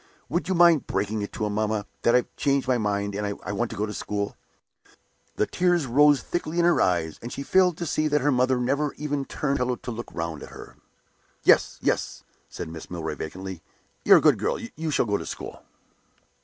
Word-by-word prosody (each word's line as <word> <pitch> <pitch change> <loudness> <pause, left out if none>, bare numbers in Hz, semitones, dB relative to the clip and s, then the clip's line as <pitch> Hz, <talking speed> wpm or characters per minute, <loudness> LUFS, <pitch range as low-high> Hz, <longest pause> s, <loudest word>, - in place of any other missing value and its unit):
Would 175 - -1
you 190 - 0
mind 170 -4 +5
breaking 105 +1 -1
it 100 - -5
to 110 - -2
him, 105 - -2
mamma, 110 -1 -1 0.2
that 120 - +3
I've 125 - 0
changed 140 -2 +1
my 125 -2 +2
mind, 100 -1 -1
and 100 0 -3
I 100 - -4
want 115 +3 -1
to - - -7
go 105 - 0
to 105 - -6
school?" 100 0 -3 1.0
The - - +1
tears 175 0 +1
rose 145 +3 +4
thickly 170 -1 -3
in 170 - +4
her 175 - +4
eyes, 85 -4 0
and 120 - -7
she 140 - -5
failed 180 +1 +3
to 175 - -3
see 155 0 0
that 150 0 +1
her 145 +2 +2
mother 130 0 +2
never 140 +4 0
even 145 -2 -3
turned 140 -1 -2
on 125 - +1
the 125 - +1
pillow - - -2
to 120 - -7
look 120 +1 -7
round 80 -3 -4
at - - -9
her. - - -12 0.7
"Yes, - - +4
yes," - - -1 0.3
said - - -6
Mrs. 80 0 -9
Milroy, 80 -3 -4
vacantly. 95 +3 -7 0.4
"You're - - +8
a - - +3
good - - +4
girl; - - 0 0.2
you 160 +1 -3
shall 145 - +2
go 100 -2 0
to - - -7
school." - - -7
125 Hz, 225 wpm, -25 LUFS, 100-150 Hz, 1.0 s, You're